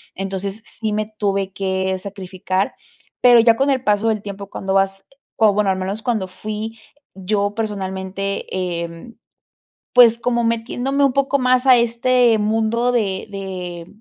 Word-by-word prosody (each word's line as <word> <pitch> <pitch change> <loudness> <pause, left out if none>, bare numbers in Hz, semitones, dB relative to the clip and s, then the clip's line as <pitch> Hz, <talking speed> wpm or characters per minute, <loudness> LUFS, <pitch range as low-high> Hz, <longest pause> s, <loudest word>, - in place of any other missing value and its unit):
Entonces, 195 +2 -4
sí 220 -2 -4
me 215 0 -1
tuve 195 -2 -1
que 190 -1 -1
sacrificar. 190 -1 -3 0.5
Pero 245 -1 +7
ya 230 0 +5
con 275 +4 +1
el 260 -1 0
paso 210 +1 +2
del 215 -2 -1
tiempo 200 -1 -8
cuando 190 0 -3
vas 195 0 +1 0.4
o 210 -2 +6
bueno 205 -1 +1
al 190 - -1
menos 195 +4 -4
cuando 220 -6 -1
fui 215 +4 -6 0.4
yo 205 +1 -1
personalmente, 195 -2 -3 0.4
em, 170 +8 -10 0.8
pues 235 -2 +7
como 240 0 0
metiéndome 245 +5 0
un 270 - +3
poco 275 0 +2
más 255 +1 +2
a 255 -1 +8
este 235 0 +3
mundo 225 +3 +1
de 200 -5 -1
de 180 -3 -6
210 Hz, 150 wpm, -20 LUFS, 195-235 Hz, 0.8 s, a